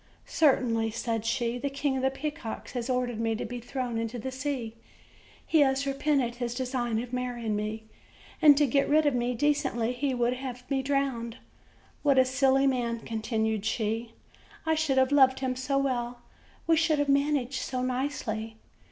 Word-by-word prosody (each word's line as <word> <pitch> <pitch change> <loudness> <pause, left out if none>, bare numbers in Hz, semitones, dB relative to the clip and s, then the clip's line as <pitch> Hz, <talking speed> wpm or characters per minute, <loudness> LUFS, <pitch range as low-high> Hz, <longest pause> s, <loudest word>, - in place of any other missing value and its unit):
"Certainly," 240 -7 +2
said 225 0 -3
she, 235 +1 -1
"the 280 +3 -2
King 275 0 -1
of - - -1
the 265 - +3
Peacocks 290 -3 -5
has 245 0 -4
ordered 250 -3 -1
me 225 -1 0
to 220 - -4
be 245 +2 -5
thrown 245 -1 -3
into 230 +1 -3
the 260 +3 -4
sea; 260 -4 -3 0.7
he 320 - +3
has 270 -1 +3
repented 275 -3 0
his 240 -1 -3
design 245 -3 -1
of 245 0 -10
marry 250 -2 -3
ing 215 -1 0
me, 215 +1 -3 0.6
and 295 -3 +8
to 295 - +5
get 275 +1 +1
rid 305 +1 +4
of 290 - +3
me 245 0 0
decently, 265 -4 +1
he 265 +1 -1
would 240 0 +1
have 250 -1 -7
me 270 -1 +2
drowned. 265 -4 -1 0.6
What 280 -2 +3
a 260 - +6
silly 265 +1 +3
man!" 240 -3 0
continued 220 -2 -1
she; 225 +1 -2 0.5
"I 320 - +2
should 310 -4 +1
have 260 +1 +4
loved 265 -2 +5
him 255 -1 -1
so 265 +2 -1
well! 245 -3 -1 0.4
we 330 - +4
should 315 -1 +3
have 290 0 +1
managed 280 -2 +1
so 255 0 -3
nicely!" 250 -4 -3
255 Hz, 180 wpm, -28 LUFS, 235-275 Hz, 0.7 s, and